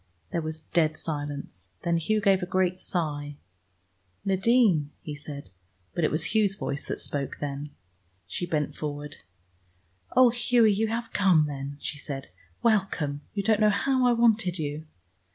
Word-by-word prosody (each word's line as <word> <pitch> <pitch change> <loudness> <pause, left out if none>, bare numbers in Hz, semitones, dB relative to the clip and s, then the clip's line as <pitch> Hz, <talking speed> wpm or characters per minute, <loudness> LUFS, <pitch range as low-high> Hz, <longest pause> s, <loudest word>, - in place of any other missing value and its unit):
There 170 - 0
was 155 0 -5
dead 155 0 +1
silence. 145 - -5
Then 170 0 +2
Hugh 215 +6 +1
gave 195 -2 +4
a 180 - -3
great 185 -1 +1
sigh. 145 -5 -2 0.9
"Nadine!" 195 - +3
he 150 - -5
said. 145 -6 -8 0.4
But 170 - -1
it 155 - +4
was 160 +5 0
Hugh's 210 -3 +3
voice 140 -7 -3
that - - -4
spoke 140 -2 -3
then. 145 0 -4 0.6
She 175 - -3
bent 150 -3 -1
forward. 145 -1 -5 1.0
"Oh, 255 -1 +8
Hughie, 240 -2 +4
you 220 +3 +1
have 230 +1 -3
come 185 -6 +4
then," 140 -1 -5
she 145 - -5
said. 140 -2 -5 0.3
"Welcome; 190 -10 +1
you 200 - 0
don't 215 +1 +3
know 215 -1 +5
how 255 +4 +2
I 245 - +5
wanted 225 -6 +3
you!" 150 0 -4
165 Hz, 155 wpm, -27 LUFS, 145-210 Hz, 1.0 s, Oh